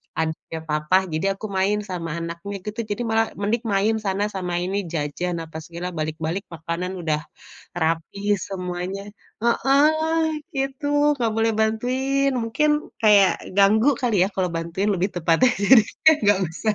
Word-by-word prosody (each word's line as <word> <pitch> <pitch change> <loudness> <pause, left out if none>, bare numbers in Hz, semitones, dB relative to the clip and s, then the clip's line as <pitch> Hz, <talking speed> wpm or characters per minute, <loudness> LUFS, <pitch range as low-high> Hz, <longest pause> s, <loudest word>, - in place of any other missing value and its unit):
Adiknya 160 0 -3
papa, 150 +4 +2 0.2
jadi 160 +4 -1
aku 215 - -8
main 205 +2 +1
sama 180 -4 -5
anaknya 170 +4 -6
gitu, 215 +2 -6
jadi 205 +3 -3
malah, 225 0 +2
"Mending 225 +4 0
main 210 +3 +2
sana, 195 +1 0
sama 180 -2 -3
ini, 195 +2 -2 0.2
jajan, 165 +4 -2
apa 160 0 -9
segala". 170 +2 -5
Balik-balik 160 +4 -3
makanan 170 +3 -4
udah 155 -2 0 0.6
rapih 165 +5 0
semuanya. 180 +1 -4 0.4
Heeh, 310 +6 +3 0.3
gitu. 290 +2 +1
Nggak 225 -2 +1
boleh 225 0 +2
bantuin, 260 +5 +1
mungkin 240 +6 0 0.4
kayak 200 -3 +7 0.3
ganggu 215 +6 +5
kali 240 -5 +1
ya, - - -1
kalau 185 -2 0
bantuin 170 +5 -2
lebih 185 +1 0
tepatnya, 175 +7 +3
jadinya 250 +8 +5
nggak 205 -1 +5
usah. 210 +6 -1
200 Hz, 145 wpm, -23 LUFS, 170-225 Hz, 0.6 s, kayak